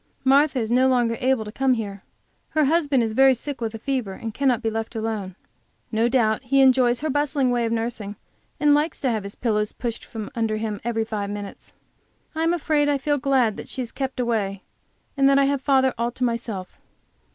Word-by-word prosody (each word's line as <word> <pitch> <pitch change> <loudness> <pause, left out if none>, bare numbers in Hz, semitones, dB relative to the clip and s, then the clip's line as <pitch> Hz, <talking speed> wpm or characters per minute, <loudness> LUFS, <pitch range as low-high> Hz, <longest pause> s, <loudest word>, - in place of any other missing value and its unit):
Martha 275 +2 +4
is 225 -2 -1
no 255 +2 +4
longer 240 -3 +2
able 255 -3 +1
to 210 - -7
come 265 +3 +2
here; 200 -4 -5 0.5
her 310 -1 +2
husband 290 -4 +2
is 220 -1 -2
very 265 +2 +5
sick 275 +2 -6
with 225 -1 -3
a - - -4
fever, 245 -4 -2
and 225 +3 -6
cannot 255 -2 +1
be 225 - +1
left 225 +1 -4
alone. 215 -4 -3 0.6
No 225 +2 +2
doubt 225 -4 +2
he 275 +2 +1
enjoys 255 -2 +4
her 310 - -1
bustling 290 -2 +1
way 240 -1 +1
of 225 - -2
nursing, 225 -3 -3 0.4
and 295 -1 +4
likes 300 +2 +1
to 260 - +1
have 220 -2 -1
his 200 +1 -8
pillows 210 -3 -1
pushed 235 -2 -5
from 220 +2 -7
under 225 -3 -1
him 215 -2 -4
every 225 -1 -1
five 210 -2 -3
minutes. 205 -1 -8 0.6
I 320 - -3
am 330 +1 +2
afraid 305 -3 +1
I 285 - +2
feel 290 +1 0
glad 255 -5 +2
that - - -8
she 260 - -4
is 235 - -8
kept 265 -1 -4
away, 210 -5 -1 0.5
and 275 -1 +4
that 275 - +4
I 275 - +4
have 280 -1 0
father 265 -1 +3
all 235 +1 +1
to 255 - -4
myself. 230 -6 -3
240 Hz, 215 wpm, -23 LUFS, 220-275 Hz, 0.6 s, very